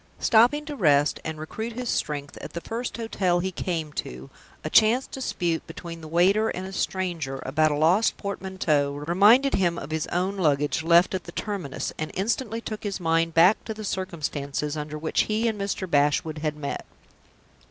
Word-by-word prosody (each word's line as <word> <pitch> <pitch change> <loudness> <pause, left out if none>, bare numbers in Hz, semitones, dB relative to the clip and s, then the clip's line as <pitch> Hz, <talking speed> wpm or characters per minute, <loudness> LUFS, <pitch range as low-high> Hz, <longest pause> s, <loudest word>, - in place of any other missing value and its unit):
Stopping 245 +7 +4
to 300 -1 -5
rest 145 - +3
and 160 0 -4
recruit 220 +9 -5
his 250 +1 -5
strength 145 -8 -2
at - - -8
the 170 - -4
first 235 +6 -4
hotel 190 -6 0
he 190 +2 -2
came 165 -4 -3
to, 65 - -6 0.3
a - - -3
chance 230 +4 +5
dispute 175 -10 -2
between 165 0 -8
the 160 - -9
waiter 190 +7 +3
and 185 - -4
a 190 - -8
stranger 170 -9 -2
about 155 +4 +2
a 150 - 0
lost 175 +9 +3
portmanteau 185 -8 -1
reminded 200 - +4
him 175 -3 +1
of 155 - -7
his 160 -1 -1
own 185 +3 -1
luggage, 150 -4 +1
left 170 +3 +4
at 185 -2 -3
the 170 - -8
terminus, 185 -9 -4
and 155 - -2
instantly 225 +3 -1
took 215 -2 -6
his 200 -2 -3
mind 165 -1 +1
back 180 +6 +5
to 220 - -5
the 215 - -7
circumstances 150 -6 -3
under 150 0 -5
which 155 +1 0
he 220 +2 0
and 215 -3 -2
Mr. 200 -1 -2
Bashwood 150 0 +1
had 150 -1 -2
met. 145 -2 -4
175 Hz, 185 wpm, -25 LUFS, 155-205 Hz, 0.3 s, chance